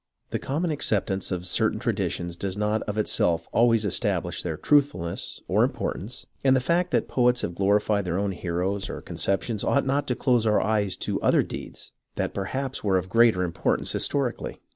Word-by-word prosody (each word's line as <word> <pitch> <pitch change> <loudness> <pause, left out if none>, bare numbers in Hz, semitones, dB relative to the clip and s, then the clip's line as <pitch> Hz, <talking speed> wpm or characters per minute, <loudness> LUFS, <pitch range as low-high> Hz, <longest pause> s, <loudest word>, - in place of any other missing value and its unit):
The - - -1
common 160 +5 -1
acceptance 100 -9 0
of 90 -1 -3
certain 90 - +1
traditions 85 -1 -2
does 95 +2 -4
not 105 +1 0
of 105 - -3
itself 85 -5 +1
always 115 -2 +3
establish 100 - -1
their 80 -3 -3
truthfulness 140 - +1
or - - +3
importance, 115 +6 -3 0.2
and 135 -1 +5
the - - +4
fact 170 +7 +1
that - - +1
poets 125 0 +2
have 85 - -3
glorified 100 +2 +2
their 85 0 -1
own 100 0 0
heroes 95 +2 -2
or - - -5
conceptions 100 +2 -2
ought 140 - +2
not 140 +2 0
to 125 - 0
close 120 -4 +2
our 105 - +4
eyes 105 -3 0
to - - -2
other - - +4
deeds - - -8 0.2
that - - -2
perhaps 130 +7 -3
were 95 -3 +3
of 95 0 -3
greater 115 -3 +4
importance 85 -2 -1
historically. 135 -4 -1
105 Hz, 180 wpm, -26 LUFS, 95-125 Hz, 0.2 s, and